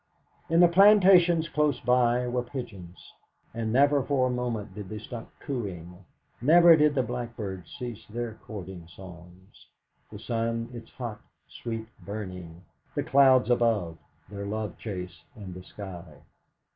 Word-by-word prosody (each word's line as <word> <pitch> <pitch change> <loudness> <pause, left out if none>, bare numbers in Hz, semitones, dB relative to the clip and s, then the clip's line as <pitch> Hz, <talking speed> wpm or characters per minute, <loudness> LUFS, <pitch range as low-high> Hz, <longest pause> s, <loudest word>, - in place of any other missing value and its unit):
In 165 +1 +4
the 175 - +8
plantations 180 -3 +6
close 150 -5 +1
by 125 0 +2
were 125 0 -1
pigeons, 115 -9 -9 0.4
and 115 -1 -3
never 140 +3 +4
for 135 -1 +1
a 130 - 0
moment 120 -4 -3
did 105 -3 -8
they 110 - -5
stop 115 +2 -8
cooing; 95 -8 -6 0.4
never 170 +5 +7
did 150 -1 +3
the 130 - +2
blackbirds 110 -7 -6
cease 120 -3 -6
their 115 +1 -4
courting 95 -5 -8
songs; 90 +1 -14 0.4
the - - -8
sun 115 0 -2
its 115 -2 -9
hot, 120 -4 -6 0.3
sweet 115 -1 -6 0.2
burning; 90 -4 -7 0.3
the - - 0
clouds 130 -2 +5
above 105 -9 +1 0.3
their 100 -1 -7
love 105 -1 -4
chase 90 -5 -6
in 100 -5 -9
the 90 - -9
sky. 95 -2 -10
115 Hz, 140 wpm, -27 LUFS, 95-130 Hz, 0.4 s, the